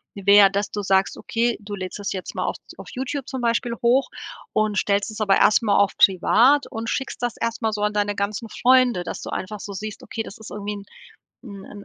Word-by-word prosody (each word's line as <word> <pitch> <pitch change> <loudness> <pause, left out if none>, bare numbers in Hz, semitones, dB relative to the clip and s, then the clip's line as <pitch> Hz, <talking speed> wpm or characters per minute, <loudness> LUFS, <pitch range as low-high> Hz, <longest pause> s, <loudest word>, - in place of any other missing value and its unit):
wäre, 200 0 +6
dass 200 +1 -1
du 205 - -4
sagst, 190 0 +1
okay, 235 +1 -1
du 205 0 -6
lädst 185 -2 -6
das 205 -1 -4
jetzt 185 -2 -6
mal - - -1
auf - - -2 0.2
auf - - -10
YouTube 265 +1 -4
zum 265 - -4
Beispiel 235 +1 0
hoch 250 +3 +3 0.4
und 215 -1 +1
stellst 200 +1 +1
es 215 - -7
aber 195 -2 +3
erst 215 - +4
mal 205 -2 +2
auf 200 -1 +2
privat 240 +9 +4
und 225 +1 -5
schickst 265 -1 -3
das 240 -2 -1
erst 230 +1 -2
mal 220 -1 +1
so 210 -1 -4
an 210 0 0
deine 205 0 0
ganzen 205 +3 -3
Freunde, 250 -5 +3
dass - - -6
du - - -7
einfach 210 +3 -5
so 205 - -7
siehst, 210 +2 -7
okay, 225 - -5
das 200 - -10
ist 220 - -11
irgendwie 210 0 -5
'n 200 -1 -9 0.8
'n 205 -1 -11
210 Hz, 230 wpm, -23 LUFS, 200-235 Hz, 0.8 s, wäre